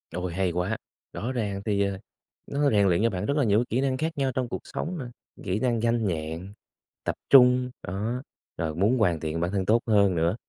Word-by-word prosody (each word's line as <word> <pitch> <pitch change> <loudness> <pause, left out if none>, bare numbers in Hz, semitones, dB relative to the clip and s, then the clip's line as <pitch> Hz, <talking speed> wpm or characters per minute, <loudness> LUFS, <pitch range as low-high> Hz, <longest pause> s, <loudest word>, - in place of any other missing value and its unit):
Ôi 90 -1 -3
hay 95 0 0
quá. 90 +6 -1 0.4
Rõ 120 +4 -3
ràng 105 -6 -2
thì, 100 -2 +1
ờ, 100 -1 -1 0.5
nó 145 0 +1
rèn 100 -2 +4
luyện 90 +3 +2
cho 115 - +4
bạn 95 -1 -3
rất 140 +6 0
là 145 - +3
nhiều 110 0 +3
kỹ 125 - +1
năng 135 -1 0
khác 160 +2 -2
nhau 135 -2 +1
trong 125 0 -2
cuộc - - -3
sống 175 +2 -4
nè, 130 - -5 0.4
kỹ 95 +3 -1
năng 120 -1 +1
nhanh 115 -1 +1
nhẹn, 85 +3 -4 0.5
tập - - -2
trung. 125 -1 +6 0.2
Đó, 110 +8 -2 0.4
rồi 80 -1 -2
muốn 105 +9 +2
hoàn 90 -8 +2
thiện 80 +1 -3
bản 85 +2 -1
thân 95 -2 -1
tốt 115 +4 +3
hơn 100 -4 +4
nữa. 85 +3 +1
105 Hz, 225 wpm, -26 LUFS, 90-125 Hz, 0.5 s, trung